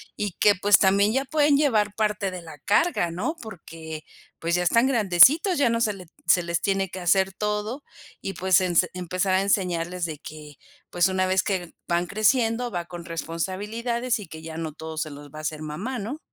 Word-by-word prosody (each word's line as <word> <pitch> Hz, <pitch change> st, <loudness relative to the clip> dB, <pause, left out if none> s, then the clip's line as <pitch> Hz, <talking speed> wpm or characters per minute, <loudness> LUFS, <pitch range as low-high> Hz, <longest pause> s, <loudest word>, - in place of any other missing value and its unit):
y 205 Hz, -2 st, -2 dB
que, 205 Hz, -2 st, +5 dB
pues, 200 Hz, +1 st, +5 dB
también 200 Hz, +2 st, +3 dB
ya 270 Hz, +1 st, 0 dB
pueden 290 Hz, 0 st, +3 dB
llevar 215 Hz, -8 st, +2 dB
parte 210 Hz, -3 st, -1 dB
de 180 Hz, -1 st, -7 dB
la 160 Hz, -3 st, -11 dB
carga, 200 Hz, -, +1 dB
¿no?, 225 Hz, -, -3 dB
porque, 160 Hz, -7 st, -9 dB, 0.4 s
pues, 170 Hz, +1 st, 0 dB
ya 180 Hz, -, +1 dB
están 230 Hz, +8 st, +3 dB
grandecitos, 265 Hz, -, +5 dB
ya 280 Hz, -, +3 dB
no 230 Hz, 0 st, 0 dB
se 215 Hz, -3 st, +2 dB
le 185 Hz, -2 st, -11 dB, 0.2 s
se 180 Hz, -, +5 dB
les 170 Hz, 0 st, -2 dB
tiene 195 Hz, -2 st, 0 dB
que 185 Hz, -, -7 dB
hacer 190 Hz, +2 st, +2 dB
todo 210 Hz, +6 st, -3 dB, 0.4 s
y, 195 Hz, -, -4 dB
pues, 185 Hz, +1 st, +3 dB
ense 180 Hz, -1 st, +2 dB
empezar 185 Hz, +1 st, -1 dB
a 190 Hz, -, +3 dB
enseñarles 180 Hz, -3 st, 0 dB
de 155 Hz, -3 st, -5 dB
que, 150 Hz, -2 st, -11 dB, 0.3 s
pues, 175 Hz, +1 st, +2 dB
una 185 Hz, 0 st, +1 dB
vez 185 Hz, 0 st, +2 dB
que 180 Hz, -4 st, -3 dB
van 175 Hz, 0 st, 0 dB
creciendo, 230 Hz, +3 st, +1 dB
va 175 Hz, -2 st, -3 dB
con 175 Hz, -1 st, -9 dB
responsabilidades 210 Hz, +9 st, -3 dB
y 205 Hz, -, -9 dB
que 160 Hz, 0 st, -10 dB
ya 160 Hz, 0 st, -8 dB
no 160 Hz, -2 st, -4 dB
todo 160 Hz, 0 st, -8 dB
se 155 Hz, 0 st, -2 dB
los 145 Hz, 0 st, -11 dB
va 155 Hz, -, -9 dB
a -, -, -6 dB
hacer 155 Hz, 0 st, -4 dB
mamá, 200 Hz, +12 st, -4 dB
¿no? 240 Hz, +10 st, -5 dB
190 Hz, 205 wpm, -25 LUFS, 170-215 Hz, 0.4 s, que